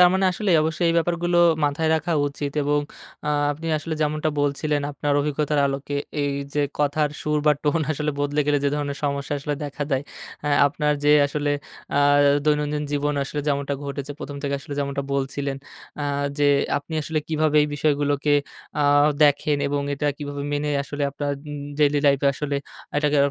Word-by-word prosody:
তার 180 - +9
মানে 190 0 +2
আসলে 205 +2 -1
অবশ্যই 160 +2 0
এই 165 - +2
ব্যাপারগুলো 175 +1 +1 0.3
মাথায় 150 +2 0
রাখা 165 +2 -1 0.2
উচিত। 140 0 -5
এবং 145 +1 +2 0.5
আ - - 0 0.2
আপনি 160 +3 -8
আসলে 160 +1 -4
যেমনটা 155 +1 0
বলছিলেন 145 +1 0
আপনার 145 0 -2
অভিজ্ঞতার 150 0 0
আলোকে 140 +1 -3 0.3
এই 140 -1 0 0.2
যে 145 - +2 0.2
কথার 150 0 +1
সুর 150 0 0
বা 150 - +7
টোন 160 +2 +1
আসলে 150 +1 -1
বদলে 145 +1 0
গেলে 145 -1 +3
যে - - +4
ধরনের 145 -1 -3
সমস্যা 140 0 -1
আসলে 145 +1 -2
দেখা 145 0 -4
দেয়, 135 0 +1 0.4
অ্যা 150 - -1 0.2
আপনার 150 +1 0
যে 150 - +6
আসলে 145 0 -2 0.5
আ - - +4 0.5
দৈনন্দিন 150 0 +1
জীবন 145 +1 0
আসলে 145 +2 -3
যেমনটা 140 0 0
ঘটেছে। 140 0 -5
১ম, 145 0 -6
থেকে 140 0 -1
আসলে 145 -1 -7
যেমনটা 140 0 -1
বলছিলেন। 140 0 -2 0.5
আ - - -1 0.3
যে 145 0 +4 0.3
আপনি 150 +3 -8
আসলে 160 +1 -1
কিভাবে 155 -1 +1
এই 150 - 0
বিষয়গুলোকে 145 0 +1 0.5
আ - - +3 0.4
দেখেন 145 0 +3
এবং 145 0 -1
এটা 150 +1 -2
কিভাবে 145 -1 -5
মেনে 145 0 -1
আসলে 145 +1 -5
আপনার 145 +1 -3 0.2
উম 145 -1 -5 0.2
ডেইলি 145 -1 +4
লাইফ 140 -1 +5
এ - - +5
আসলে 145 0 -2 0.4
এটাকে 150 0 +2
145 Hz, 180 wpm, -23 LUFS, 140-150 Hz, 0.5 s, তার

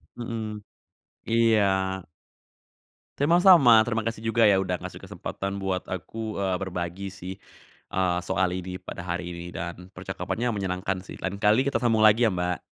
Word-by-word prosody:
Mhm, 110 -3 -5 0.7
iya. 115 -2 +4 1.5
Sama-sama, 150 - +7
terima 115 -1 -1
kasih 115 -1 -3
juga 115 +1 +2
ya 100 -2 +5
udah 90 -1 -1
ngasih - - -8
kesempatan 100 +1 -5
buat 95 -1 -2
aku, 110 +4 -5
eee, 95 -2 0
berbagi 90 +1 -4
sih, 95 0 -7 0.6
eee, 90 -2 +1
soal 95 +1 0
ini 90 0 -5
pada 90 -1 -8
hari 90 0 -4
ini 85 0 -7
dan 85 +2 -7
percakapannya 120 +1 -3
menyenangkan 95 -1 -2
sih, - - -10
lain 95 +2 -4
kali 110 +6 +4
kita 140 - 0
sambung 115 -3 +3
lagi 110 +2 +6
ya, - - -3
Mbak. 90 0 -1
100 Hz, 150 wpm, -26 LUFS, 90-115 Hz, 1.5 s, Sama-sama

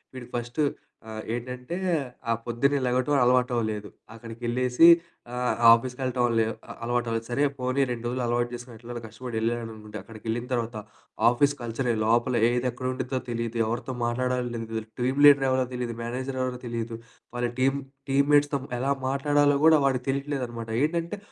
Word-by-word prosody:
వీడు 125 -2 -8
ఫస్టు 120 +5 -1 0.5
ఆహ్, 110 0 -5
ఏంటంటే 125 +5 -5 0.5
ఆ - - +4
పొద్దున్నే 140 +4 +1
లేగటం 125 +3 +1
అలవాటవ్వలేదు. 120 -4 +1 0.2
అక్కడికెళ్ళేసి 120 +5 +2 0.5
ఆహ్, 125 0 0 0.2
ఆఫీసుకెళ్ళటం 125 +1 0
లే 110 - +3 0.4
అలవాటులేదు. 115 -1 -1
సరే 140 +4 +1 0.2
పోనీ 130 +2 0
2 120 -1 -5
రోజులు 125 +1 -2
అలవాటు 120 0 0
చేసుకొని 120 0 -8
ఎట్లాగొ 120 +1 -7
కష్టపడి 110 +1 -6
ఎళ్ళాడు 120 +1 0
అనుకుంటే 105 0 -9
అక్కడికి 110 -1 -13
ఎళ్ళిన 120 +2 -2
తర్వాత 120 -1 -2 0.5
ఆఫీసు 140 +4 +2
కల్చర్ 120 +2 -3 0.2
లోపలేది 120 +1 +2
ఎక్కడవుండిద్దో 130 +1 -3
తెలీదు, 115 0 -3
ఎవరితో 120 +3 -3
మాట్లాడాలో 125 +1 -1
తెలీదు. 115 -1 -4 0.2
టీమ్ 130 +3 0
లీడర్ 140 -2 +7
ఎవరో 130 0 +2
తెలీదు, 120 -2 -3
మేనేజర్ 130 +3 -4
ఎవరో 130 -1 -2
తెలీదు. 115 -1 -4 0.4
వాళ్ళ 120 0 0
టీమ్, 135 +2 +2 0.3
టీమ్ 140 +1 +3
మేట్స్‌తో 145 -1 +4 0.2
ఎలా 135 +2 0 0.2
మాట్లాడాలో 145 +1 +3
గూడా 160 -1 +7
వాడికి 130 -2 +1
తెలీట్లేదన్నమాట. 135 -5 -3
ఏంటంటే 170 +5 -1
125 Hz, 145 wpm, -26 LUFS, 115-130 Hz, 0.5 s, లీడర్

